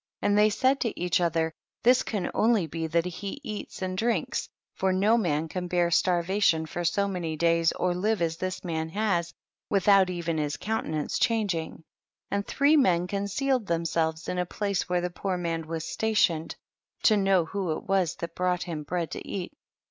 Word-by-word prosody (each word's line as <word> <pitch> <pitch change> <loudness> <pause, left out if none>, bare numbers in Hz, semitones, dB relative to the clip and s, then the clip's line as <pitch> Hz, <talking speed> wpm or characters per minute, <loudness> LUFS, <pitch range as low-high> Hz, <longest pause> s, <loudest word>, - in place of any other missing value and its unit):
30. - - +3
And 205 0 +3
they 210 +1 +6
said 265 +5 +2
to 230 - -2
each 180 0 +1
other, 165 -1 +1 0.3
this 250 +1 +5
can 200 -6 -3
only 220 -5 +3
be 160 +1 -4
that 165 +2 +1
he 195 +8 -5
eats 215 -5 -6
and 185 0 -2
drinks, 220 -3 -1 0.2
for 190 0 0
no 200 +5 +3
man 165 -8 0
can 180 +2 -4
bear 175 -1 +2
starva 180 +3 +1
tion 160 -5 +3
for 175 +3 -4
so 200 +4 +1
many 175 -5 -3
days 165 +1 +3
or 180 -1 0
live 210 +4 0
as 165 -1 -1
this 185 +1 -4
man 160 -2 -2
has, 175 -3 0 0.4
without 195 -1 +4
even 170 -3 -2
his 150 -1 -2
counten 205 -8 -2
ance 150 - -2
changing; 195 -9 0 0.5
and 200 0 -1
three 285 +2 +3
men 180 - +3
con 200 +2 -2
cealed 255 +2 0
themselves 165 -1 -1
in 180 - -2
a 180 - 0
place 200 -1 -2
where 180 0 +1
the 180 0 -2
poor 185 +1 -2
man 165 -2 -3
was 165 0 -4
stationed, 170 -3 +1 0.5
to 215 - +6
know 195 -4 +3
who 185 -1 -2
it - - -10
was 190 -5 +1
that 170 - -6
brought 180 -1 0
him 165 -4 -5
bread 170 +2 -3
to - - -6
eat. 190 +5 -4
180 Hz, 195 wpm, -27 LUFS, 165-200 Hz, 0.5 s, they